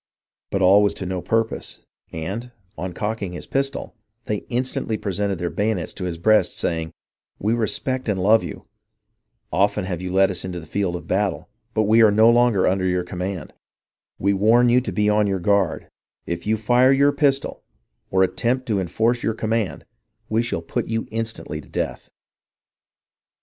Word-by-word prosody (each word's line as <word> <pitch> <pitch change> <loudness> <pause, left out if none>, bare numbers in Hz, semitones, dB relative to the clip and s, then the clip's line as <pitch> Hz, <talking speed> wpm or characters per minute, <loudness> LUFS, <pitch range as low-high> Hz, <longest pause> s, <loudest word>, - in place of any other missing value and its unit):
But 95 -1 0
all 95 +3 +7
was 100 - +2
to 95 - -5
no 90 0 -3
purpose, 115 +3 -2 0.3
and, 95 +10 -5 0.3
on 90 +3 -4
cocking 105 0 -3
his 85 - -7
pistol, 135 0 -2 0.3
they 105 - -1
instantly 120 -3 -1
pre 100 - -3
sented 100 0 -1
their 85 +1 -3
bayonets 105 -5 -1
to 95 - -5
his 85 -2 -3
breast, 110 +5 +3
saying, 80 -1 -2 0.3
" - - -52
IVi^ 110 +3 +1
respect 130 +3 -1
and 100 -2 0
love 105 +4 +4
you; - - -8 0.9
often 100 +2 +2
Jiave 90 -2 -4
you 90 0 -4
led 95 +1 +4
us 90 - -3
into 90 -1 -5
the 80 - -11
field 90 +2 -1
of 90 - -7
battle, 100 +1 -1 0.3
but 110 - +3
ive 110 +2 +5
are 110 - +7
no 110 +3 +5
longer 120 -5 +3
under 95 0 +1
your 90 -1 0
command; 90 -1 -5 0.6
we 100 +1 +1
warn 115 +5 +4
you 125 +1 +4
to 115 - -4
be 105 +3 +1
on 105 0 +3
your 95 -1 0
guard; 100 -2 +1 0.4
if 85 +2 -4
you 110 +1 +2
fire 125 +4 +4
your 140 +1 +4
pistol 140 -2 0 0.5
or 95 0 +3
attempt 125 +7 0
to 105 -6 0
enforce 115 +7 0
your 110 - -1
command, 110 -3 -2 0.5
tve 110 +2 +2
shall 85 -8 -3
put - - -3
you 115 0 -2
instantly 110 -8 -4
to 65 - -19
death.'' - - -4
105 Hz, 180 wpm, -22 LUFS, 95-115 Hz, 0.9 s, all